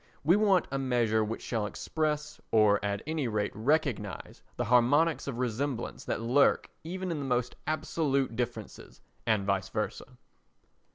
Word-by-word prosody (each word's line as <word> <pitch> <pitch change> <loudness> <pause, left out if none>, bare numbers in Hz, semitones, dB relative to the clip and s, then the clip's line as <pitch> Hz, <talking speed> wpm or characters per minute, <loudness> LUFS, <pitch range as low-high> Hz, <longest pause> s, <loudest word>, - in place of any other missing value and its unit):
We 165 +5 +5
want 200 -4 +3
a 135 - -1
measure 120 -4 +2
which 110 +1 -4
shall 110 -3 -1
express, 150 +3 -2
or 105 -2 +4
at 100 -1 -2
any 155 -3 -1
rate 105 -2 -1
recognise, 120 -5 -1 0.2
the - - -1
harmonics 145 +8 +3
of 130 -4 -3
resemblance 125 +1 -2
that - - -2
lurk 125 +5 +3
even 185 +2 -4
in 160 - -2
the 140 - -3
most 125 -1 0
absolute 140 -4 0
differences 115 -3 -5 0.3
and 105 -3 +2
vice 100 -1 0
versa. - - -4
125 Hz, 150 wpm, -30 LUFS, 110-150 Hz, 0.3 s, We